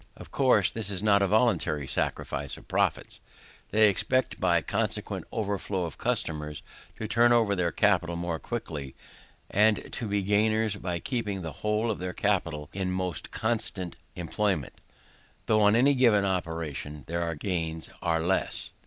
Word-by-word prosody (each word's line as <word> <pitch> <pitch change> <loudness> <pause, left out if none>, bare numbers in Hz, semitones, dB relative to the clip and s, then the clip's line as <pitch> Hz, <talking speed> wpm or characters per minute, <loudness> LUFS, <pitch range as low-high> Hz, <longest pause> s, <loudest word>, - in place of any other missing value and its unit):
Of - - -12
course, 125 -8 +3
this 110 -3 -2
is 100 -1 -1
not 100 -2 +5
a 100 - +3
voluntary 105 - +2
sacrifice - - -2
of - - -15
profits: - - 0 0.5
they 110 +1 +5
expect 130 +6 +1
by 85 -2 +3
the 80 - -12
consequent - - -2
overflow 100 -3 -2
of 80 - -8
customers 75 -1 -2 0.3
to 110 - -4
turn 120 +2 +4
over 115 -4 +4
their 90 -2 0
capital 90 -5 +2
more 85 -1 -3
quickly, 75 - -5 0.6
and 105 +1 +2
to 115 - -3
be 100 -1 0
gainers 110 +1 +2
by 90 -3 -3
keeping 105 -2 -3
the 80 - -4
whole 105 +2 +1
of 105 - -4
their 90 0 -4
capital 85 -8 0
in 95 -1 -2
more 90 -1 -1 0.2
constant 105 -6 -1 0.2
employment, 90 -3 -1 0.7
though 110 -1 +3
on 105 +1 +5
any 135 +4 +5
given 115 -6 +4
operation 80 -5 -3
their 85 0 -2
gains 80 -2 -3
are 80 -1 +1
less. 95 +3 -1
95 Hz, 155 wpm, -28 LUFS, 85-110 Hz, 0.7 s, not